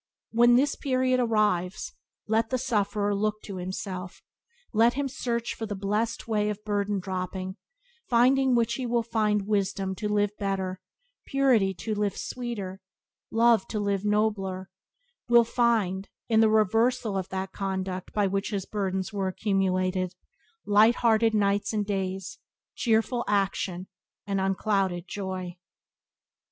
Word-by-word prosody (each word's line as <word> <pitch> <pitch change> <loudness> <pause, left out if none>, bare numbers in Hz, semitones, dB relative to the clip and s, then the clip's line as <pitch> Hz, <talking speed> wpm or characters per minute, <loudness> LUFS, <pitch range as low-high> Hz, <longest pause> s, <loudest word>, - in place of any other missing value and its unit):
When 240 +1 +5
this 280 +3 +3
period 255 -2 +1
arrives 210 -6 0 0.3
let 220 +1 +1
the 255 - 0
sufferer 210 -4 0
look 210 +1 0
to 195 -3 -7
himself; 185 0 -6 0.5
let 230 +2 +4
him 285 0 -1
search 235 -2 -2
for 225 - -5
the 205 - -4
blessed 210 +5 -2
way 210 -2 +1
of 210 0 -5
burden 205 -1 0
dropping, 185 0 -4 0.5
finding 255 +2 +4
which 235 -1 +2
he 250 0 -3
will 235 0 +1
find 210 -3 0
wisdom 195 -2 0
to 210 - -2
live 205 -1 +2
better, 190 -2 -2 0.5
purity 245 -9 +3
to 215 +6 -3
live 205 -1 -1
sweeter, 205 -7 -5 0.5
love 230 -2 +4
to 215 - -3
live 200 -1 0
nobler; 205 -3 0 0.6
will 235 0 +7
find, 225 -5 +1 0.2
in 220 -2 +3
the 220 -1 +5
reversal 220 +1 +2
of 190 -1 -2
that 190 0 -4
conduct 190 -2 -4
by 205 -1 +1
which 195 +1 -1
his 200 -3 -3
burdens 190 -1 -2
were 195 -2 -1
accumulated, 185 -2 0 0.5
light 215 +3 +5
hearted 225 -1 +3
nights 200 0 +1
and 210 -1 0
days, 190 -2 -3 0.3
cheerful 235 +1 +1
action, 195 -2 0 0.4
and 195 -1 -1
unclouded 190 -2 0
joy. 185 -3 -5
205 Hz, 140 wpm, -27 LUFS, 190-225 Hz, 0.6 s, will